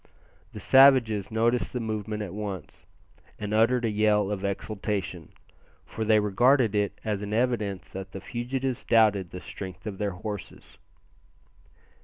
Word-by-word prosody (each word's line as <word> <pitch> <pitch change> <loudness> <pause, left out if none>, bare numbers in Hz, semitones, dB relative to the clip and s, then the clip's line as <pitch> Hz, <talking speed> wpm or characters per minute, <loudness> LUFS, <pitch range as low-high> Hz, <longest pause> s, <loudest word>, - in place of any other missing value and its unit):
The - - -7
savages 130 -7 +5
noticed 115 +2 +1
the 125 - -2
movement 110 -1 -3
at 95 -3 -7
once, 100 -3 -7 0.5
and 105 0 -4
uttered 115 +3 +3
a - - +1
yell 105 -1 +2
of 100 -2 -3
exultation, 100 -4 -3 0.5
for 110 - -5
they 110 0 +4
regarded 115 +3 +3
it 105 -1 -1
as 105 -2 -1
an 105 0 -4
evidence 110 -5 -1
that 95 0 -8
the 95 - -7
fugitives 125 +3 -3
doubted 105 -5 +3
the 90 - -7
strength 90 0 -9
of 100 -3 -6
their 105 -1 0
horses. 105 +2 -8
105 Hz, 145 wpm, -27 LUFS, 100-115 Hz, 0.5 s, savages